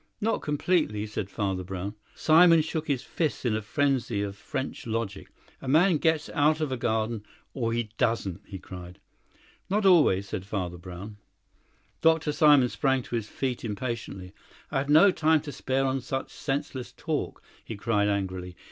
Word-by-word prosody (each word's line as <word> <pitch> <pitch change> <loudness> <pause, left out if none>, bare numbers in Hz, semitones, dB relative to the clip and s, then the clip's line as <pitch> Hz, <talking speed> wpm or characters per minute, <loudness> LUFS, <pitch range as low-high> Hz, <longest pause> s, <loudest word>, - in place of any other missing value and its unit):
"Not 225 +2 0
completely," 150 - 0
said 105 -2 -4
Father 95 -3 -2
Brown. 95 +2 -5 0.2
Simon 165 0 +6
shook 160 0 -3
his 135 -4 0
fists 155 -3 -2
in 115 -3 +2
a 110 - -1
frenzy 120 -3 0
of 100 -1 -4
French 130 +3 -5
logic. 110 -3 -3 0.3
"A - - -8
man 160 +5 +4
gets 160 0 +1
out 150 +1 +2
of 155 -3 -1
a - - 0
garden, 110 -2 -1 0.3
or 115 -4 -1
he 115 -2 -2
doesn't," 100 -5 0
he 100 - -7
cried. 90 -1 -10 0.7
"Not 205 +2 +1
always," 145 - +5
said 95 - -4
Father 90 -3 -4
Brown. 90 +4 -9 0.8
Dr. 160 -1 +3
Simon 145 -4 +5
sprang 135 -2 +1
to 120 - -5
his 110 -2 -2
feet 130 -3 -3
impatiently. 105 -4 -5 0.4
"I - - +1
have 140 +1 -3
no 160 +7 +7
time 160 -2 +3
to 150 -1 -7
spare 135 +1 -1
on 135 0 0
such 135 +1 -4
senseless 135 -2 -3
talk," - - -3 0.2
he 110 - -6
cried 105 -1 +1
angrily. 95 -3 -3
120 Hz, 165 wpm, -27 LUFS, 100-150 Hz, 0.8 s, no